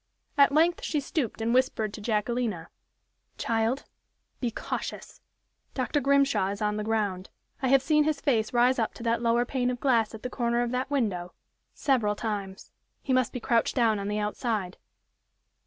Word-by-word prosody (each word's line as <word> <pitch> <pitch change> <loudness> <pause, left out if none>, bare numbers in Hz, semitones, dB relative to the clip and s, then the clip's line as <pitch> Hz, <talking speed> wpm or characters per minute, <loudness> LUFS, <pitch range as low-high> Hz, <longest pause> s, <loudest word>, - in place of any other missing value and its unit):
At 280 -2 +6
length 330 +4 +3
she 305 - 0
stooped 275 -5 -3
and 230 +1 +1
whispered 245 -5 +1
to 215 - -7
Jacquelina: 215 -4 -1 0.7
"Child, 230 +4 0 0.6
be 245 - 0
cautious; 225 - -6 0.5
Dr. 270 +3 0
Grimshaw 275 -6 +3
is 200 0 -4
on 210 -1 0
the 210 - -2
ground 205 -4 -1 0.3
I 265 - +1
have 270 0 +4
seen 300 0 +3
his 305 -2 0
face 230 -7 +1
rise 245 +1 +3
up 225 - -1
to - - -9
that 230 -1 +1
lower 235 +1 +2
pane 250 -1 -1
of 245 -1 -3
glass 230 -5 +2
at 220 - -11
the 250 - -3
corner 235 -1 0
of 240 - -2
that 255 +1 -2
window, 200 -11 -1 0.4
several 230 -7 +1
times. 200 -4 -5 0.3
He 265 - 0
must 255 -3 +2
be 250 - -4
crouched 235 -1 +1
down 225 -5 +3
on 200 - -4
the 210 +1 -1
outside." 210 -3 -2
235 Hz, 175 wpm, -27 LUFS, 215-260 Hz, 0.7 s, At